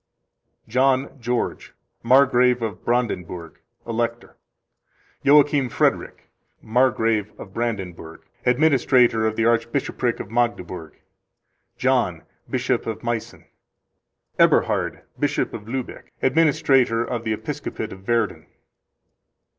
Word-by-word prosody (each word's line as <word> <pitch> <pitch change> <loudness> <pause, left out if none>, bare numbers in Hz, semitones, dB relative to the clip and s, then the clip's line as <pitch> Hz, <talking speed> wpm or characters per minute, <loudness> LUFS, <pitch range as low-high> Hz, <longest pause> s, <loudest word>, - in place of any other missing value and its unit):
John 130 +3 +1
George, 120 +1 -2 0.3
Margrave 125 -1 +4
of 105 -5 -5
Brandenburg, 90 -9 -2 0.3
Elector. 115 0 -3 0.9
Joachim 145 -2 +4
Frederick, - - -1 0.3
Margrave 110 -3 +1
of 95 - -10
Brandenburg, 95 -8 -4 0.2
Administrator 125 -4 +3
of 110 - -2
the 115 - +1
Archbishopric 115 +1 0
of 100 - -7
Magdeburg. 95 -9 -2 0.8
John, - - +1 0.3
Bishop 125 -2 -1
of 110 +1 -5
Meissen. 120 -2 -4 0.9
Eberhard, - - +2 0.2
Bishop - - 0
of 105 - -8
Luebeck, 130 0 -6
Administrator 130 -5 +3
of 120 -1 -4
the 110 -1 -1
Episcopate 110 - -5
of 95 0 -14
Werden. 115 -2 0
120 Hz, 95 wpm, -22 LUFS, 110-130 Hz, 0.9 s, Margrave